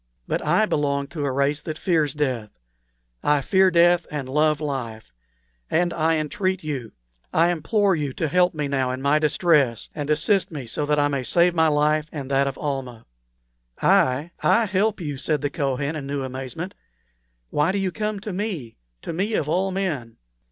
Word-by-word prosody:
But -, -, -1 dB
I 215 Hz, -, +3 dB
belong 140 Hz, -6 st, 0 dB
to 150 Hz, -2 st, -4 dB
a 140 Hz, -, 0 dB
race 140 Hz, +2 st, +1 dB
that 155 Hz, 0 st, -5 dB
fears 155 Hz, -6 st, +1 dB
death. 130 Hz, -7 st, -1 dB, 0.7 s
I 145 Hz, -1 st, +2 dB
fear 190 Hz, +6 st, +4 dB
death 175 Hz, 0 st, +4 dB
and 145 Hz, -3 st, -4 dB
love 150 Hz, +2 st, +2 dB
life; 120 Hz, -, -5 dB, 0.6 s
and 175 Hz, +1 st, +1 dB
I 165 Hz, 0 st, +2 dB
entreat 185 Hz, +4 st, -1 dB
you, 135 Hz, -7 st, -4 dB, 0.4 s
I 170 Hz, +2 st, +3 dB
implore 190 Hz, +4 st, +1 dB
you 145 Hz, -3 st, -2 dB
to 160 Hz, -, -1 dB
help 180 Hz, +3 st, +2 dB
me 150 Hz, -2 st, -2 dB
now 135 Hz, -2 st, 0 dB
in 130 Hz, +1 st, -4 dB
my 145 Hz, +2 st, +3 dB
distress, 150 Hz, -, +2 dB
and 145 Hz, -1 st, -5 dB
assist 170 Hz, +6 st, +2 dB
me 145 Hz, -6 st, -6 dB
so 145 Hz, +5 st, -2 dB
that 150 Hz, 0 st, +2 dB
I 145 Hz, 0 st, +3 dB
may 140 Hz, -2 st, -1 dB
save 170 Hz, +8 st, +3 dB
my 160 Hz, -1 st, +3 dB
life 150 Hz, 0 st, +2 dB
and 140 Hz, -3 st, -6 dB
that 135 Hz, 0 st, +3 dB
of 135 Hz, -, -4 dB
Almah." 130 Hz, -6 st, -4 dB, 0.7 s
"I 135 Hz, +6 st, +3 dB
I 230 Hz, 0 st, +4 dB
help 205 Hz, +2 st, 0 dB
you!" 145 Hz, -5 st, -4 dB
said 150 Hz, +1 st, 0 dB
the 145 Hz, -, -1 dB
Kohen, 140 Hz, -1 st, -1 dB
in 140 Hz, -3 st, -5 dB
new 140 Hz, -1 st, -2 dB
amazement. 130 Hz, +8 st, -5 dB, 0.8 s
"Why 150 Hz, +4 st, +2 dB
do 200 Hz, -, -1 dB
you 195 Hz, -2 st, -1 dB
come 210 Hz, +1 st, -3 dB
to 210 Hz, -1 st, -5 dB
me 180 Hz, -, -4 dB, 0.3 s
to -, -, -4 dB
me, 200 Hz, +6 st, -1 dB
of 150 Hz, -, 0 dB
all 185 Hz, +5 st, +1 dB
men? 160 Hz, -12 st, -3 dB
150 Hz, 185 wpm, -23 LUFS, 140-175 Hz, 0.8 s, fear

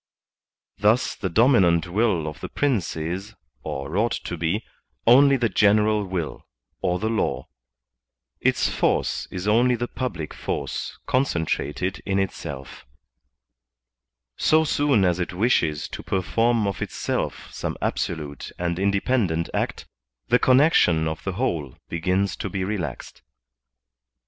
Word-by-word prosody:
Thus 110 Hz, +5 st, +3 dB
the 95 Hz, -, -3 dB
dom 115 Hz, +10 st, +4 dB
inant 85 Hz, -7 st, +4 dB
will 90 Hz, -4 st, +1 dB
of 75 Hz, -, -6 dB
the -, -, -6 dB
Prince 115 Hz, -, 0 dB
is, 90 Hz, +7 st, -4 dB, 0.3 s
or 70 Hz, +5 st, -5 dB
ought 115 Hz, +3 st, +1 dB
to 90 Hz, -, -4 dB
be, 85 Hz, +7 st, -1 dB, 0.4 s
only 135 Hz, +4 st, +7 dB
the 120 Hz, -2 st, +2 dB
general 105 Hz, +1 st, +3 dB
will, 90 Hz, -4 st, -4 dB, 0.3 s
or 90 Hz, -, +1 dB
the 110 Hz, -, -2 dB
law; 110 Hz, 0 st, -1 dB, 0.9 s
its -, -, +2 dB
force -, -, 0 dB
is 95 Hz, +2 st, -5 dB
only 120 Hz, +4 st, +4 dB
the 120 Hz, +1 st, -3 dB
public 120 Hz, -, -4 dB
force -, -, -4 dB
concentrated 90 Hz, -, -1 dB
in 95 Hz, -1 st, -1 dB
itself; 70 Hz, -8 st, -4 dB, 1.5 s
so 160 Hz, +1 st, +4 dB
soon 145 Hz, -8 st, +2 dB
as 90 Hz, -1 st, +1 dB
it 90 Hz, -, -2 dB
wishes 85 Hz, -, +1 dB
to -, -, -6 dB
per 95 Hz, -1 st, -1 dB
form 115 Hz, +3 st, +2 dB
of 100 Hz, -1 st, -3 dB
itself -, -, -3 dB
some -, -, -4 dB
absolute 75 Hz, -4 st, -3 dB
and 85 Hz, 0 st, -2 dB
independent 100 Hz, -3 st, +1 dB
act, -, -, -2 dB, 0.4 s
the 125 Hz, +1 st, +5 dB
connection 125 Hz, -, +4 dB
of 80 Hz, 0 st, -4 dB
the 95 Hz, -, -2 dB
whole 75 Hz, -7 st, -2 dB
begins 90 Hz, +2 st, 0 dB
to -, -, -4 dB
be 95 Hz, -2 st, -2 dB
relaxed. 90 Hz, -, -4 dB
95 Hz, 135 wpm, -24 LUFS, 85-115 Hz, 1.5 s, only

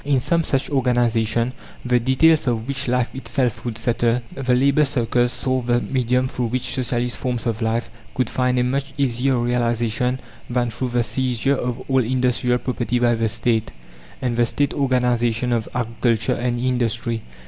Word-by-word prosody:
In 140 Hz, -2 st, +2 dB
some 165 Hz, +6 st, +1 dB
such 135 Hz, -3 st, 0 dB
organization, 120 Hz, -2 st, +1 dB, 0.3 s
the 125 Hz, 0 st, +3 dB
details 135 Hz, +5 st, +3 dB
of 115 Hz, -1 st, -1 dB
which 140 Hz, 0 st, -2 dB
life 125 Hz, -1 st, 0 dB
itself 130 Hz, -3 st, -2 dB
would 115 Hz, -3 st, -4 dB
settle, 120 Hz, +1 st, +1 dB
the 130 Hz, -2 st, +1 dB
labour 140 Hz, +4 st, +4 dB
circles 120 Hz, -3 st, +1 dB
saw 130 Hz, 0 st, -1 dB
the 120 Hz, 0 st, +1 dB
medium 125 Hz, 0 st, 0 dB
through 125 Hz, -2 st, -2 dB
which 125 Hz, +2 st, -2 dB
Socialist 125 Hz, -2 st, -1 dB
forms 125 Hz, -2 st, -2 dB
of 115 Hz, -1 st, -2 dB
life 115 Hz, +1 st, -1 dB, 0.2 s
could 130 Hz, -3 st, +1 dB
find 125 Hz, +1 st, 0 dB
a 125 Hz, -, +3 dB
much 135 Hz, +2 st, -2 dB
easier 130 Hz, -1 st, +1 dB
realization 120 Hz, +1 st, 0 dB, 0.3 s
than 120 Hz, -1 st, 0 dB
through 125 Hz, +3 st, -3 dB
the 120 Hz, 0 st, +1 dB
seizure 125 Hz, +3 st, 0 dB
of 125 Hz, -1 st, -4 dB
all 130 Hz, -1 st, +3 dB
industrial 125 Hz, 0 st, +1 dB
property 125 Hz, -1 st, -2 dB
by 120 Hz, -1 st, +3 dB
the 115 Hz, -1 st, 0 dB
State, 115 Hz, 0 st, 0 dB, 0.5 s
and 120 Hz, -2 st, -1 dB
the 120 Hz, -, +4 dB
State 145 Hz, +3 st, 0 dB
organization 125 Hz, -3 st, +1 dB
of 115 Hz, -2 st, -1 dB
agriculture 115 Hz, -2 st, 0 dB
and 120 Hz, 0 st, -1 dB
industry. 120 Hz, -2 st, -1 dB
125 Hz, 170 wpm, -21 LUFS, 120-130 Hz, 0.5 s, labour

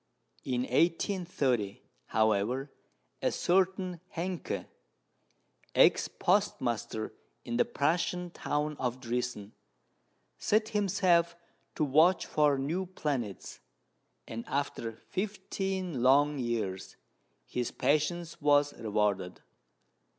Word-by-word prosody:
In 125 Hz, -2 st, -1 dB
1830, 160 Hz, -, 0 dB, 0.2 s
however, 110 Hz, +6 st, +1 dB, 0.5 s
a -, -, +2 dB
certain 185 Hz, -1 st, +1 dB, 0.2 s
Hencke, 175 Hz, +1 st, -3 dB, 1.1 s
ex -, -, +5 dB
postmaster 125 Hz, -, 0 dB, 0.3 s
in 120 Hz, -, -2 dB
the -, -, +4 dB
Prussian 175 Hz, +4 st, 0 dB
town 150 Hz, -2 st, -2 dB
of 125 Hz, 0 st, -2 dB
Driessen, 120 Hz, -4 st, -3 dB, 0.9 s
set 215 Hz, +1 st, +2 dB
himself 185 Hz, -5 st, +2 dB, 0.4 s
to -, -, 0 dB
watch 160 Hz, +6 st, +4 dB
for 150 Hz, -2 st, +3 dB
new 165 Hz, +8 st, -2 dB
planets, 135 Hz, -, -4 dB, 0.7 s
and 115 Hz, +1 st, -5 dB
after 135 Hz, -4 st, -2 dB
fifteen 190 Hz, -, -3 dB
long 140 Hz, +3 st, +4 dB
years 110 Hz, -6 st, -3 dB, 0.5 s
his 125 Hz, -1 st, -2 dB
patience 155 Hz, +5 st, 0 dB
was 145 Hz, 0 st, +4 dB
rewarded. 105 Hz, -4 st, -1 dB
145 Hz, 90 wpm, -31 LUFS, 120-180 Hz, 1.1 s, ex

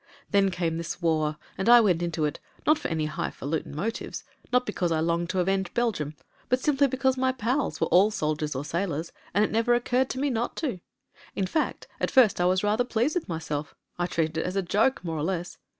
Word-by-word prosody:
"Then 200 Hz, -1 st, +4 dB
came 170 Hz, -3 st, -1 dB
this 170 Hz, +1 st, -5 dB
war 155 Hz, -3 st, +1 dB, 0.2 s
and 195 Hz, -, +1 dB
I 240 Hz, 0 st, +10 dB
went 185 Hz, -7 st, +3 dB
into 170 Hz, -2 st, -1 dB
it 150 Hz, -, -3 dB
— -, -, -31 dB
^not 305 Hz, 0 st, +4 dB
for -, -, -3 dB
any 160 Hz, -2 st, -1 dB
highfalutin 150 Hz, -1 st, -3 dB
motives, 220 Hz, +9 st, -4 dB, 0.3 s
not 250 Hz, 0 st, +3 dB
because 180 Hz, -5 st, -1 dB
I 160 Hz, -, +2 dB
longed 170 Hz, +1 st, 0 dB
to 185 Hz, -, 0 dB
avenge 190 Hz, 0 st, 0 dB
Belgiimi 205 Hz, -12 st, 0 dB, 0.2 s
— -, -, -33 dB
^but 255 Hz, -, +4 dB
simply 280 Hz, +1 st, +2 dB
because 265 Hz, 0 st, +1 dB
my 260 Hz, 0 st, +2 dB
pals 255 Hz, +3 st, -1 dB
were -, -, +2 dB
all 195 Hz, +4 st, +6 dB
soldiers 150 Hz, -6 st, -2 dB
or 135 Hz, +3 st, -3 dB
sailors, 165 Hz, -1 st, -2 dB, 0.2 s
and 205 Hz, +3 st, +3 dB
it -, -, 0 dB
never 230 Hz, +2 st, +3 dB
occurred 245 Hz, +2 st, +1 dB
to 260 Hz, -, -3 dB
me 280 Hz, 0 st, +1 dB
not 235 Hz, 0 st, -2 dB
to. 255 Hz, -, -2 dB, 0.6 s
In 195 Hz, -, 0 dB
fact 310 Hz, -, -1 dB
at -, -, 0 dB
first 235 Hz, -8 st, +5 dB
I -, -, +3 dB
was 185 Hz, +2 st, +2 dB
rather 210 Hz, +4 st, +2 dB
pleased 245 Hz, +4 st, 0 dB
with 355 Hz, -, -2 dB
myself 155 Hz, -3 st, -4 dB
— -, -, -39 dB
I 175 Hz, -, +1 dB
treated 160 Hz, -2 st, -1 dB
it -, -, -1 dB
as 180 Hz, -, -4 dB
a 195 Hz, -, +1 dB
joke 220 Hz, +8 st, +1 dB
more 165 Hz, -2 st, -3 dB
or -, -, -1 dB
less. 175 Hz, 0 st, -3 dB
190 Hz, 230 wpm, -27 LUFS, 165-240 Hz, 0.6 s, I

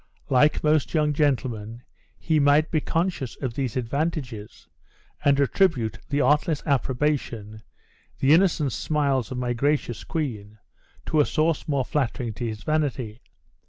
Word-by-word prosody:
Like 145 Hz, +3 st, +3 dB
most 155 Hz, +1 st, +2 dB
young 150 Hz, -1 st, +2 dB
gentlemen, 120 Hz, -6 st, -1 dB, 0.3 s
he 160 Hz, -2 st, +1 dB
might 145 Hz, +2 st, +4 dB
be 155 Hz, -, +1 dB
conscious 165 Hz, -7 st, -2 dB
of 130 Hz, -4 st, -3 dB
these 130 Hz, -1 st, -2 dB
advantages, 125 Hz, -4 st, -3 dB, 0.6 s
and 140 Hz, -1 st, +4 dB
attribute 130 Hz, -, +1 dB
the 145 Hz, +1 st, +1 dB
artless 150 Hz, +3 st, +2 dB
approbation, 130 Hz, -6 st, -1 dB, 0.6 s
the 135 Hz, +2 st, +4 dB
innocent 165 Hz, -5 st, +3 dB
smiles 140 Hz, -3 st, 0 dB
of 130 Hz, -, -4 dB
my 125 Hz, -1 st, -1 dB
gracious 140 Hz, -1 st, -1 dB
queen, 110 Hz, -10 st, -4 dB, 0.5 s
to 155 Hz, -, +1 dB
a 145 Hz, -, +5 dB
source 160 Hz, 0 st, 0 dB
more 140 Hz, -4 st, 0 dB
flattering 125 Hz, -4 st, -2 dB
to 120 Hz, +2 st, -4 dB
his 110 Hz, -1 st, -6 dB
vanity. 135 Hz, -7 st, -2 dB
140 Hz, 135 wpm, -25 LUFS, 120-150 Hz, 0.6 s, a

